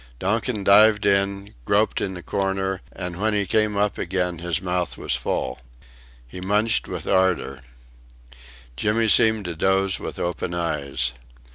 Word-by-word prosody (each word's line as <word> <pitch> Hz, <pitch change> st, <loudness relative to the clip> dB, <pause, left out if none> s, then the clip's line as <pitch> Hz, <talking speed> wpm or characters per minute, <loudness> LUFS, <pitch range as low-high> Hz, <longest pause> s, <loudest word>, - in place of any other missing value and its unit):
Donkin 105 Hz, -, -1 dB
dived 105 Hz, +1 st, +5 dB
in, 100 Hz, 0 st, 0 dB
groped 105 Hz, -, +1 dB
in 95 Hz, -1 st, -3 dB
the 90 Hz, -, -9 dB
corner 95 Hz, -1 st, -2 dB
and 90 Hz, 0 st, -6 dB
when 110 Hz, 0 st, +1 dB
he 100 Hz, -1 st, +1 dB
came 105 Hz, +2 st, +1 dB
up 105 Hz, 0 st, 0 dB
again 90 Hz, -1 st, -2 dB
his 85 Hz, -2 st, -1 dB
mouth 90 Hz, -1 st, -2 dB
was -, -, -2 dB
full. -, -, -3 dB, 0.7 s
He 90 Hz, +9 st, -9 dB
munched 105 Hz, +4 st, +1 dB
with -, -, -6 dB
ardour. 95 Hz, -8 st, +1 dB, 1.2 s
Jimmy 105 Hz, -, +1 dB
seemed 110 Hz, -1 st, +4 dB
to 85 Hz, -1 st, -4 dB
doze 95 Hz, +2 st, +1 dB
with -, -, -6 dB
open 85 Hz, 0 st, -3 dB
eyes. 70 Hz, -7 st, -1 dB
95 Hz, 145 wpm, -23 LUFS, 90-105 Hz, 1.2 s, dived